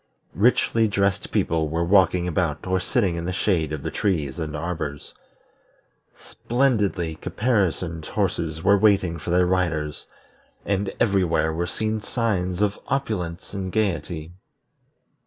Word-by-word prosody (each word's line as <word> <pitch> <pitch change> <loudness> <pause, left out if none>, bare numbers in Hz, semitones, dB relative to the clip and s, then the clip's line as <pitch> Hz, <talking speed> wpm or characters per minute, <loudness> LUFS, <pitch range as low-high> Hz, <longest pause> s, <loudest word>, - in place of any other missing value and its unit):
Richly 115 +1 +3
dressed 100 -2 0
people 80 -2 +1
were 85 +2 0
walking 90 -1 +4
about 80 -3 -1
or 95 0 +1
sitting 95 -3 0
in 85 - -4
the 90 - -1
shade 90 -5 0
of 75 -3 -4
the - - -3
trees 85 -8 -1
and 75 -2 -4
arbors; 75 -3 -4 1.0
splendidly 105 -10 0
caparisoned 90 -6 -1
horses 80 0 -2
were 100 +1 +5
waiting 95 -5 +3
for - - -6
their 90 +1 +4
riders; 85 -5 -1 0.6
and 100 0 0
everywhere 90 -6 +2
were 85 +2 -2
seen 110 +1 -2
signs 100 -6 -1
of 105 -1 0
opulence 100 -13 -3
and 95 -2 -4
gayety. 85 -6 -2
90 Hz, 130 wpm, -24 LUFS, 85-100 Hz, 1.0 s, were